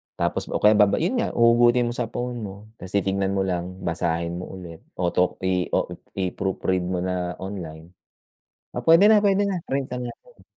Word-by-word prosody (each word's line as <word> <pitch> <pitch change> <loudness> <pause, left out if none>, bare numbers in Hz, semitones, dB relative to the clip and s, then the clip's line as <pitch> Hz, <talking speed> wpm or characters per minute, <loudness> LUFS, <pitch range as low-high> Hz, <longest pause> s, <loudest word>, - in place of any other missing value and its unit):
tapos - - -1
o - - -5
kaya 105 - +8
baba, 105 -1 +5
yun 235 +10 0
nga, - - 0
huhugutin 120 +1 +4
mo - - -5
sa 120 -2 -2
phone 120 +1 -4
mo, 100 -3 -6 0.2
tapos 95 +2 -7
titignan 100 0 0
mo 95 - +1
lang, 90 0 -4
basahin 85 0 -2
mo 90 - -7
ulit, 85 -3 -10 0.2
auto, 90 0 +1
i 90 -1 +1
o, - - 0 0.2
i-proofread 95 -1 -1
mo 90 -1 -1
na 90 -2 -2
online. 85 -4 -7 0.8
"Ah, - - -3
puwede 165 +5 +6
na, 215 -1 +6
puwede 200 0 +3
na, 185 -4 -2
print 135 -1 0
na 125 -1 -4
natin." - - -18
95 Hz, 185 wpm, -24 LUFS, 90-120 Hz, 0.8 s, kaya